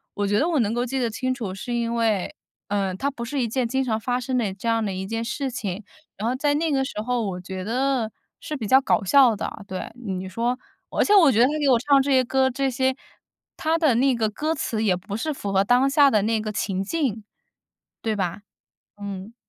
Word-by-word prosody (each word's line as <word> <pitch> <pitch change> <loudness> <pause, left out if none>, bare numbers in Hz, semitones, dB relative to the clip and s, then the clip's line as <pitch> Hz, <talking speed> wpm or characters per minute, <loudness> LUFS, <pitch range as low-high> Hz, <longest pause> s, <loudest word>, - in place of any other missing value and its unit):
我 205 - -1
觉 205 +1 +2
得 310 - +2
我 320 -4 +1
能 220 -2 +1
够 240 +1 0
记 265 +2 -3
得 240 -2 0
清 255 +3 -2
楚， 225 -8 -5
是 215 +6 -5
因 235 0 -1
为， 225 +1 0 0.3
嗯， 195 -2 -1
它 280 - 0
不 245 -4 -7
是 280 +4 -4
一 240 - 0
件 250 +1 0
经 265 +3 0
常 220 -4 -1
发 245 +2 -1
生 255 +1 -2
的 210 -5 0
这 200 +4 -7
样 230 -1 +2
的 195 - -2
一 190 +1 -4
件 225 +3 -3
事 265 +4 -3
情， 205 -4 -4 0.3
然 215 - -2
后 245 - +1
在 290 +2 +1
那 320 +1 0
个 270 -2 +2
时 210 -5 -4
候 245 +1 -1
我 190 -3 -3
觉 185 0 -6
得 245 +1 0 0.3
是 305 - -5
比 225 -5 -4
较 260 +5 +6
搞 260 - +1
笑 245 +3 +5
的， 200 - -6
对。 185 -1 -5 0.2
你 190 -2 -3
说 235 +5 -1 0.3
而 - - +1
且 415 - +3
我 335 -8 +7
觉 225 - +1
得 240 - +7
他 275 - +1
给 285 -2 +2
我 250 - +6
唱 275 +2 +4
这 280 - -1
些 260 -1 +5
歌， 265 +1 +2
这 270 +1 -1
些 260 +1 0 0.6
他 320 +1 +1
的 310 -7 +3
那 265 +3 +3
个 220 -2 0
歌 305 +9 -2
词 225 -6 -2
也 190 -4 +3
不 185 +3 -6
是 305 +6 -2
符 200 -7 -5
合 195 0 +3
当 250 +6 +3
下 285 0 +5
的 215 -6 +3
那 220 +1 +1
个 215 0 -3
情 195 -2 -2
境， 230 -3 -2 0.8
对 220 -1 0
吧？ 185 0 -2 0.6
嗯。 200 +2 -7
235 Hz, 260 characters per minute, -24 LUFS, 205-265 Hz, 0.8 s, 我